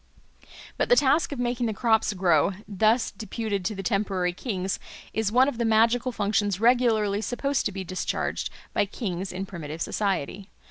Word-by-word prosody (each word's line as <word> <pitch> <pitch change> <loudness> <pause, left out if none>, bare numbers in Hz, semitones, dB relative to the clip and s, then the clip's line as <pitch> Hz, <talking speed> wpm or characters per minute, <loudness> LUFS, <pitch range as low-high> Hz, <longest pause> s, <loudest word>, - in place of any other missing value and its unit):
But - - 0
the - - +7
task 295 - +3
of 285 - -4
making 245 -1 -1
the 220 - -2
crops 220 -1 +2
grow, 180 -2 +3
thus 215 +4 +2
deputed 215 -1 -4
to 210 +2 -1
the 195 - -5
temporary 190 -2 0
kings, 190 -2 -3 0.3
is 220 -2 0
one 255 +3 +5
of 245 -5 -3
the - - +2
magical 230 +3 +3
functions 205 -3 0
regularly 225 -4 +3
supposed 275 +5 -1
to - - -5
be 190 -1 -5
discharged 185 +1 -2 0.2
by 205 - +1
kings 190 -3 -4
in 185 +2 -4
primitive 160 -5 -7
society. 195 +1 -2
210 Hz, 170 wpm, -26 LUFS, 190-235 Hz, 0.3 s, the